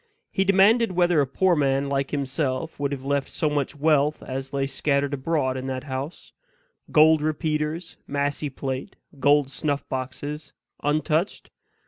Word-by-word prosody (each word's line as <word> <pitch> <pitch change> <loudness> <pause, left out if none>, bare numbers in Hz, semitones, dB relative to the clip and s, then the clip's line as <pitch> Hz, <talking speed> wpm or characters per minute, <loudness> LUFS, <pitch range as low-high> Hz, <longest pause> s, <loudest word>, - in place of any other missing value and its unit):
He 190 - +2
demanded 195 +3 +4
whether 175 -3 +3
a 140 - 0
poor 180 +6 +2
man 140 -2 +1
like 140 -1 -1
himself 140 +2 -2
would 140 0 -1
have 135 -1 -5
left 140 0 0
so 155 -2 -1
much 145 0 -1
wealth 150 0 +2
as 135 +1 -5
lay 140 -1 0
scattered 140 0 0
abroad 135 -2 0
in 130 +1 -5
that 130 -1 -3
house 135 +3 -6 0.6
gold 155 0 +6
repeaters, 155 +2 -2
massy 145 +1 -1
plate, 135 0 -5 0.2
gold 145 0 +3
snuff 145 +1 -2
boxes 140 +3 -5 0.3
untouched? 155 +4 0
145 Hz, 145 wpm, -25 LUFS, 135-155 Hz, 0.6 s, gold